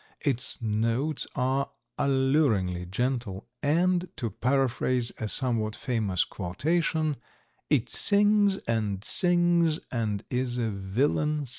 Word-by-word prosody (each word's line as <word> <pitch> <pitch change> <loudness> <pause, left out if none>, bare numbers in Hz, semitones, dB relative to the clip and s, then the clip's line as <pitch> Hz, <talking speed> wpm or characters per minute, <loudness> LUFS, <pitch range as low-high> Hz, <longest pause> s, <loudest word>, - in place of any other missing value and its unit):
Its 130 -4 0
notes 115 +7 -1
are 130 +1 0 0.3
alluringly 130 - +1
gentle, 115 -1 -2
and, 175 +4 +2
to 115 -5 -3
paraphrase 125 +1 +1
a 110 - -2
somewhat 110 -3 0
famous 110 -8 0
quotation, 155 - -1 0.5
"It 130 -5 +2
sings 205 -1 +3
and 105 -4 -1
sings 175 -1 +2
and 110 -5 -2
is 125 -1 -1
a 115 -2 -1
villain 140 +10 0
still." - - -7
130 Hz, 110 wpm, -27 LUFS, 110-150 Hz, 0.5 s, sings